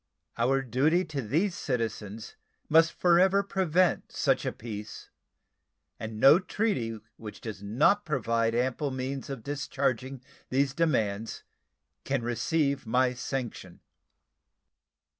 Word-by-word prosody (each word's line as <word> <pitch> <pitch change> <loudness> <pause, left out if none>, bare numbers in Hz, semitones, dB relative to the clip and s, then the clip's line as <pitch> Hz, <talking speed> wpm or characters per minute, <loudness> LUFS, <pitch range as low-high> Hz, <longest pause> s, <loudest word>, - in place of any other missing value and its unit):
Our 135 +3 +1
duty 150 +9 +2
to 150 -4 -4
these 160 - 0
citizens 110 -7 -4 0.3
must 165 +1 +5
forever 185 +3 +4
prevent 185 -2 +1
such - - +1
a - - 0
peace, 105 -2 -8 0.9
and 110 -1 -6
no 140 +8 +8
treaty 180 - -1 0.2
which 105 -2 -9
does 110 -4 -7
not 130 - +2
provide 115 - 0
ample 130 +4 0
means 130 +1 -4
of 135 -5 -6
discharging 135 -2 -2 0.3
these 135 +1 +1
demands 115 -9 -1 0.6
can 135 -3 -1
receive 140 +2 0
my 125 +2 +2
sanction. 125 -8 -5
130 Hz, 110 wpm, -28 LUFS, 115-155 Hz, 0.9 s, no